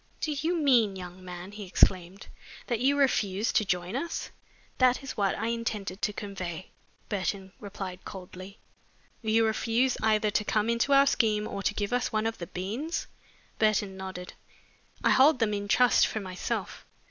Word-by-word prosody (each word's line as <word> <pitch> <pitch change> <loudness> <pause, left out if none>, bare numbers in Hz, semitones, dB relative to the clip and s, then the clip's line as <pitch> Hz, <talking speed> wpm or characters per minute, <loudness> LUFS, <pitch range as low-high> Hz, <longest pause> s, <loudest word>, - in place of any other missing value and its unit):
"Do 310 - -1
you 315 +4 0
mean, 245 - +3
young 180 0 -9
man," 180 +1 -8
he 210 0 -8
exclaimed, 185 +1 +2 0.4
"that 235 -4 -1
you 275 +4 +3
refuse 215 -6 +2
to 215 - +3
join 180 +1 -2
us?" 335 +6 -3 0.5
"That 255 +1 +4
is 275 - -6
what 200 -2 +1
I 225 +2 -1
intended 215 -5 -3
to 210 - +1
convey," 185 -4 -6 0.4
Burton 190 -1 -3
replied 190 -2 -7
coldly. 185 +1 -9 0.6
"You 225 0 +3
refuse 230 +3 +1
either 215 -1 +2
to 210 - +1
come 215 +2 +1
into 235 +4 +1
our 275 0 +7
scheme 215 -6 +2
or 200 - -5
to 205 - 0
give 205 +1 -2
us 245 0 0
one 215 -1 0
of 225 0 -2
the 170 - -5
beans?" 225 - -3 0.5
Burton 210 -3 +2
nodded. 190 -1 -7 0.7
"I - - +4
hold 275 +2 +6
them 225 -3 +1
in 205 0 -3
trust 250 +4 +5
for 220 - -3
myself." 185 -2 -4
210 Hz, 170 wpm, -28 LUFS, 190-235 Hz, 0.7 s, our